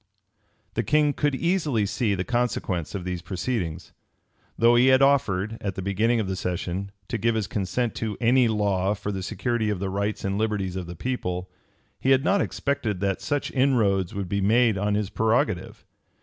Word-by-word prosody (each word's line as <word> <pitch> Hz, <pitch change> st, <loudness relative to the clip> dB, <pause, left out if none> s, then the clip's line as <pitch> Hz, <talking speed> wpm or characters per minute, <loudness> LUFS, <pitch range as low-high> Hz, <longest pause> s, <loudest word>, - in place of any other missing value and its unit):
The 115 Hz, -, 0 dB
king 150 Hz, +5 st, +2 dB
could 145 Hz, -1 st, 0 dB
easily 155 Hz, -, +1 dB
see 105 Hz, 0 st, 0 dB
the 90 Hz, -, -2 dB
consequence 115 Hz, -8 st, -1 dB
of 90 Hz, -3 st, -4 dB
these 90 Hz, -1 st, -3 dB
proceedings. 90 Hz, -5 st, -3 dB, 0.6 s
Though 115 Hz, +1 st, +5 dB
he 120 Hz, +2 st, +5 dB
had 130 Hz, +1 st, +6 dB
offered, 110 Hz, -6 st, +2 dB
at 100 Hz, -3 st, -3 dB
the 95 Hz, -, -4 dB
beginning 110 Hz, +5 st, +1 dB
of 105 Hz, -, -1 dB
the 95 Hz, -, -2 dB
session, 90 Hz, +1 st, -3 dB, 0.2 s
to 120 Hz, -, -3 dB
give 115 Hz, +2 st, +1 dB
his 110 Hz, -2 st, 0 dB
consent 105 Hz, +5 st, -2 dB
to 110 Hz, -3 st, -3 dB
any 125 Hz, +1 st, +4 dB
law 100 Hz, -2 st, +1 dB
for 105 Hz, 0 st, -4 dB
the 95 Hz, -1 st, -4 dB
security 110 Hz, +4 st, -1 dB
of 105 Hz, -, -1 dB
the 95 Hz, +1 st, -3 dB
rights 100 Hz, +2 st, -2 dB
and 100 Hz, +1 st, -1 dB
liberties 105 Hz, -4 st, -1 dB
of 90 Hz, -2 st, -4 dB
the 85 Hz, -, -7 dB
people, 90 Hz, -5 st, -3 dB, 0.5 s
he 130 Hz, -, 0 dB
had 135 Hz, 0 st, +5 dB
not 200 Hz, +5 st, +3 dB
expected 115 Hz, -9 st, -2 dB
that 100 Hz, -1 st, 0 dB
such 145 Hz, -1 st, -2 dB
inroads 110 Hz, -10 st, +2 dB
would 100 Hz, -2 st, -3 dB
be 100 Hz, +2 st, -1 dB
made 110 Hz, +2 st, +4 dB
on 105 Hz, +2 st, 0 dB
his 105 Hz, -1 st, -1 dB
prerogative. 110 Hz, -4 st, 0 dB
105 Hz, 190 wpm, -25 LUFS, 95-120 Hz, 0.6 s, had